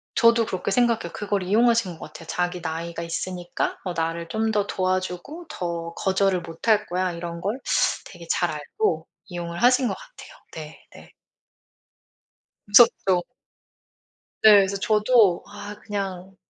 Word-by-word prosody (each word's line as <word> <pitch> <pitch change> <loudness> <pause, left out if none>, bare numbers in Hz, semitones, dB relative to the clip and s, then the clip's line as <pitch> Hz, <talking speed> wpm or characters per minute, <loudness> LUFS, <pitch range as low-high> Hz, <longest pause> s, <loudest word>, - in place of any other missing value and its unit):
저도 230 -1 +5
그렇게 185 +1 -3
생각해요. 230 -7 +1
그걸 205 -2 -2
이용하신 225 -1 +2
것 - - -8
같아요. 165 +1 -13
자기 180 0 -2
나이가 165 +1 -4
있으니까 175 +1 -3
어 180 -2 -3
나를 165 0 -2
좀 220 +4 -1
더 205 -1 +1
도와주고 185 - -3
더 170 - -4
거절을 190 -1 +1
못할 210 +6 0
거야 180 0 -1
이런 170 0 -6
걸 215 +7 -2 0.5
되게 - - -12
잘 - - +1
알고 435 -1 -2 0.2
이용을 170 0 -6
하신 250 +1 +4
것 - - -2
같아요. - - -14 0.2
네. 155 -1 -9 0.2
네. - - -14 1.5
무섭죠. 200 -4 +5 1.2
네. 215 - +9
그래서 200 0 +2
저도 210 -2 +3
아 205 0 -8
그냥 195 -2 -5
190 Hz, 275 characters per minute, -24 LUFS, 175-215 Hz, 1.5 s, 네